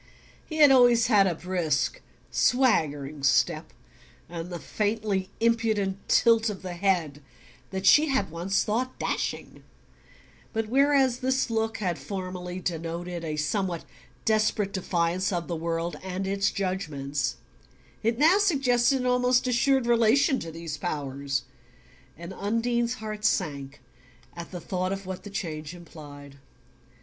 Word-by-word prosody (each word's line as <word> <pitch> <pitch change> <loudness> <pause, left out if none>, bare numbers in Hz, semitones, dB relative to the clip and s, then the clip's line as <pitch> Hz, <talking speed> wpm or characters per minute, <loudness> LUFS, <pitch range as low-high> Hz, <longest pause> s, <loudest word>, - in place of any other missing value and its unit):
He 315 - -7
had 295 -3 +7
always 245 -3 +6
had 205 -5 +4
a 175 - 0
brisk 170 -4 -1 0.3
swaggering 155 - +1
step, 140 +4 +2 0.6
and 170 +1 -6
the 175 - -5
faintly 205 -1 -2
impudent 220 -4 +1
tilt 230 -1 +4
of 195 -2 -7
the 180 -1 -5
head 170 -6 0 0.5
that 190 0 -4
she 300 +10 +6
had 265 - 0
once 180 +4 0
thought 245 +4 -2
"dashing"; - - -3 0.9
but 220 -1 -2
whereas 270 -1 +3
this 260 -1 0
look 225 0 -1
had 180 -5 -2
formerly 185 -2 -5
denoted 170 0 -4
a 155 -2 -3
somewhat 175 +2 -1 0.4
desperate 215 -2 +1
defiance 180 +1 0
of 175 -2 -2
the 170 - -3
world 165 +1 -2
and 190 +1 -4
its 195 +1 +1
judgments 145 -9 -2 0.7
it 230 +1 0
now 325 +8 +5
suggested 270 - +2
an - - -3
almost 250 0 +2
assured 255 +1 +2
relation 240 +4 +3
to 165 - -6
these 165 -2 -6
powers; 140 -4 -3 0.7
and 170 +3 -8
Undine's 235 +4 0
heart 215 -2 -7
sank 145 -9 -1 0.6
at 170 -1 -7
the 180 - -6
thought 185 +2 -2
of 195 0 -4
what 185 0 -6
the 205 - -9
change 165 -5 -5
implied. 145 -5 -12
190 Hz, 135 wpm, -27 LUFS, 165-230 Hz, 0.9 s, had